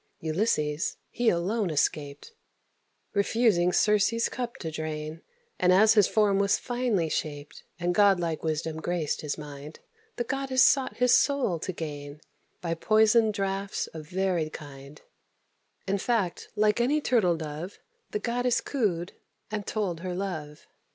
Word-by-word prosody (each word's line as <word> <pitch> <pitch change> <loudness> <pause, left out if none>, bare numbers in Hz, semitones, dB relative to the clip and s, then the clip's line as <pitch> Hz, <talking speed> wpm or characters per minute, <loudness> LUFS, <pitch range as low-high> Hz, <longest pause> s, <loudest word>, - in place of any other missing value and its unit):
Ulysses, 155 -3 0
he 240 -1 +2
alone 190 +4 0
escaped, 145 - -2 0.8
Refusing 200 -3 +2
Circe's 210 +4 +2
cups 245 +1 -5
to 160 - -4
drain; 155 0 -5 0.4
And, 180 - +4
as 215 +4 +6
his 210 -4 +5
form 205 -2 +2
was 200 0 +3
finely 240 -9 -1
shaped, 145 -2 -4 0.2
And 175 +1 0
god 200 -1 +5
like 165 -2 -2
wisdom 160 0 -2
graced 165 -2 -2
his 150 -2 -3
mind, 150 0 -9 0.4
The 240 - -1
goddess 265 +1 +1
sought 270 -2 +2
his 250 0 +4
soul 265 - +2
to 185 - -3
gain, 145 -3 -7 0.4
By 170 -2 -1
poisoned 215 +4 +3
draughts 195 0 -2
of 155 -2 -8
varied 180 -3 -1
kind: 140 0 -10 0.9
In 195 +1 0
fact, 200 -6 -1
like 210 +2 +2
any 285 +6 +2
turtle 215 - +2
dove, 160 +4 -6 0.3
The 425 - -2
goddess 245 - 0
cooed, 195 - -2 0.4
and 210 -2 -4
told 195 -6 -2
her 180 0 -4
love. 160 -6 -5
185 Hz, 140 wpm, -27 LUFS, 155-220 Hz, 0.9 s, as